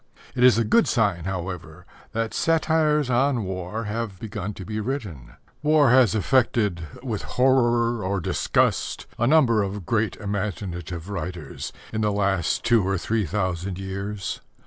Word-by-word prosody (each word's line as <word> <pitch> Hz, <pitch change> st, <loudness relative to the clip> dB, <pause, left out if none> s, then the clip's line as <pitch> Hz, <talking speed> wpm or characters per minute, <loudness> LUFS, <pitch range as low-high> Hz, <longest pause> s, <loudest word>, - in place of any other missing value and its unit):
It 125 Hz, -, 0 dB
is 125 Hz, -2 st, +7 dB
a 115 Hz, -, +3 dB
good 220 Hz, -, +3 dB
sign, 100 Hz, -8 st, +1 dB
however, 90 Hz, -3 st, -5 dB, 0.3 s
that 115 Hz, 0 st, -2 dB
satires 155 Hz, -3 st, +2 dB
on 125 Hz, -1 st, +2 dB
war 95 Hz, +3 st, -4 dB
have 105 Hz, -3 st, -4 dB
begun 105 Hz, -2 st, -5 dB
to 95 Hz, -, -8 dB
be 110 Hz, 0 st, -4 dB
written. 105 Hz, -, -5 dB, 0.3 s
War 150 Hz, -4 st, +4 dB
has 125 Hz, -4 st, +5 dB
affected 105 Hz, -6 st, +1 dB, 0.2 s
with 115 Hz, -6 st, -3 dB, 0.2 s
horror 120 Hz, -3 st, +3 dB
or 95 Hz, +1 st, -1 dB
disgust 85 Hz, -, 0 dB
a 120 Hz, -, +2 dB
number 130 Hz, -7 st, +4 dB
of 100 Hz, -1 st, -4 dB
great 110 Hz, 0 st, 0 dB
imaginative 95 Hz, -5 st, -4 dB
writers 85 Hz, -6 st, -5 dB, 0.2 s
in 110 Hz, -, -1 dB
the 105 Hz, -1 st, +2 dB
last 100 Hz, -4 st, 0 dB
two 115 Hz, -2 st, +4 dB
or 95 Hz, 0 st, 0 dB
three 110 Hz, +1 st, -1 dB
thousand 95 Hz, 0 st, -2 dB
years. 95 Hz, +1 st, -4 dB
105 Hz, 145 wpm, -24 LUFS, 95-120 Hz, 0.3 s, is